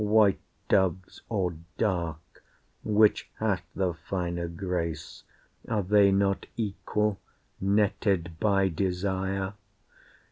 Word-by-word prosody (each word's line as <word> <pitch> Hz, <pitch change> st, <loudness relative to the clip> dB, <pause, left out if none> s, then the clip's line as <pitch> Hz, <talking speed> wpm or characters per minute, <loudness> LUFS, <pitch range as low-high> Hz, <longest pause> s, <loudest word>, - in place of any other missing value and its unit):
White 105 Hz, -2 st, +4 dB, 0.3 s
doves 95 Hz, -1 st, +1 dB
or 95 Hz, -6 st, -1 dB, 0.2 s
dark, 85 Hz, -5 st, -2 dB, 0.4 s
which 105 Hz, 0 st, +3 dB
hath 100 Hz, -5 st, 0 dB
the 95 Hz, -2 st, 0 dB
finer 85 Hz, +1 st, -3 dB
grace? 85 Hz, -2 st, -4 dB, 0.4 s
Are 110 Hz, -3 st, 0 dB
they 100 Hz, +1 st, +5 dB
not 100 Hz, 0 st, +1 dB
equal, 105 Hz, -1 st, -1 dB, 0.4 s
netted 95 Hz, -4 st, +1 dB
by 100 Hz, -2 st, +3 dB
desire? 95 Hz, +2 st, -1 dB
95 Hz, 95 wpm, -28 LUFS, 90-105 Hz, 0.4 s, they